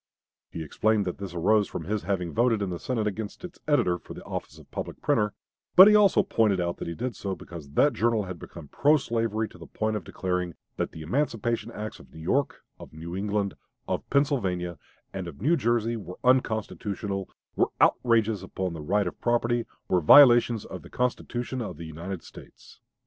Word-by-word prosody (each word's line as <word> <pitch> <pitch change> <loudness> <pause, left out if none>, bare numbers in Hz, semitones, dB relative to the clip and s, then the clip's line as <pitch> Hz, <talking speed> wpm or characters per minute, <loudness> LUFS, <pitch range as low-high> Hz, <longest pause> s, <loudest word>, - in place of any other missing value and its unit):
He 80 - -6
explained 105 +6 +1
that 90 - -4
this 95 -3 -6
arose 105 +4 +3
from - - -5
his 105 +5 -2
having 90 -2 -2
voted 115 -2 +2
in 95 - -2
the 85 - -4
Senate 115 -4 -1
against 105 - -4
its 180 - -11
editor 110 -13 +2
for - - -11
the - - -9
office - - -6
of - - -17
public - - -5
printer; 105 -1 +1 0.4
but 190 +2 +11
he 210 - +7
also 210 -2 +5
pointed 105 -4 +2
out 85 0 -1
that - - -6
he 85 - -4
did 125 +1 -3
so 95 0 -4
because 80 -6 -10
that 145 - +4
journal 115 -2 +1
had 90 -3 -7
become 85 -4 -10
pro 150 - +3
slavery 115 -4 -1
to - - -16
the - - -10
point 110 0 -2
of 105 - -3
declaring 90 -2 -3 0.2
"that - - -2
the 80 - -9
emancipation 115 - -1
acts 110 0 -6
of - - -16
New 80 - -12
York, 130 - -1 0.2
of - - -11
New 85 +3 -7
England, 100 0 -1 0.3
of - - -3
Pennsylvania, 95 - 0 0.3
and 95 -2 -4
of 80 -5 -9
New 150 - +3
Jersey 120 -4 +1
were 90 -5 -8
unconstitutional, 105 -5 0 0.3
were - - +2
outrages 115 -3 +3
upon 95 -2 -4
the 80 - -6
right 100 +7 +1
of 90 - -6
property, 120 0 +1 0.2
were 90 - +2
violations 120 - +7
of - - -8
the - - -13
Constitution 125 0 -2
of 90 -8 -5
the 85 - -7
United 85 +3 -6
States." - - -15
105 Hz, 200 wpm, -27 LUFS, 90-120 Hz, 0.4 s, but